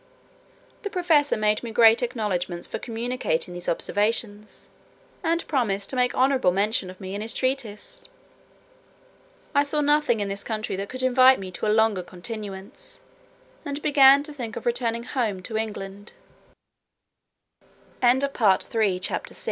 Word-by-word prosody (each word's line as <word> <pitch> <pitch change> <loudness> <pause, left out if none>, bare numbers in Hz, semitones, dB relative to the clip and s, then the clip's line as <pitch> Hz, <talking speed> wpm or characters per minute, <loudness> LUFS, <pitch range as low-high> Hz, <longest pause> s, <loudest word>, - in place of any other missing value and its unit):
The 410 - -4
professor 330 - +2
made 210 0 +1
me 235 - -6
great 225 0 +5
acknowledgments 200 -8 -2
for - - -5
communicating 230 -7 -2
these 175 0 -4
observations, 210 +3 -2 0.5
and 335 0 -1
promised 205 -9 0
to - - -4
make 250 -1 +1
honourable 260 -6 +3
mention 200 0 0
of 185 - -11
me 190 -1 -7
in 200 - -4
his 225 +1 -3
treatise. 255 - -3 1.4
I 285 - +4
saw 290 +1 0
nothing 295 -5 +2
in 205 - -1
this 200 0 -3
country 215 -3 -3
that 200 +1 -5
could 255 0 -5
invite 255 +1 +6
me 190 -1 -7
to 185 - -3
a - - +2
longer 220 -4 +3
continuance, 200 - -7 0.6
and 285 -2 -4
began 280 -1 +6
to 300 0 -7
think 235 -6 -6
of - - -7
returning 235 -1 0
home 220 -8 -2
to 220 - -7
Engl 215 -3 -3
225 Hz, 135 wpm, -25 LUFS, 205-265 Hz, 1.4 s, invite